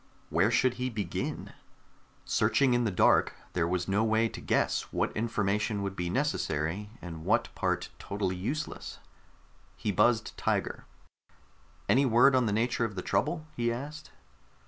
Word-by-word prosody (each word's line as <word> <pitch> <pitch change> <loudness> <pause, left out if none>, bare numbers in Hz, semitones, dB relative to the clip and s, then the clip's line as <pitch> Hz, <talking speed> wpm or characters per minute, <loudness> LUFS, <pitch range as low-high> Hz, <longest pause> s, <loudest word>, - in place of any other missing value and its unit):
Where 85 +7 +3
should 120 +2 +3
he 130 - 0
begin? 105 -7 -4 0.7
Searching 135 -3 +3
in 120 0 +2
the - - +2
dark, 90 - +3 0.2
there 85 -2 +1
was 90 0 -1
no 100 +3 +2
way 110 +1 +3
to - - -8
guess - - 0
what - - -1
information 105 -1 0
would 100 -1 -3
be 90 -2 -2
necessary 100 - -1
and 80 -3 -7
what - - +1
part - - -1
totally 100 -2 -2
useless. 140 +12 -4 0.8
He 105 - -1
buzzed 115 +4 +2
Tiger. - - -1 1.0
"Any 135 +2 +4
word 125 +3 +6
on 130 -3 +3
the - - 0
nature 115 +3 +1
of 110 -3 -2
the 90 - -4
trouble?" 155 +1 0
he 120 0 0
asked. 145 +6 -6
110 Hz, 150 wpm, -29 LUFS, 95-125 Hz, 1.0 s, word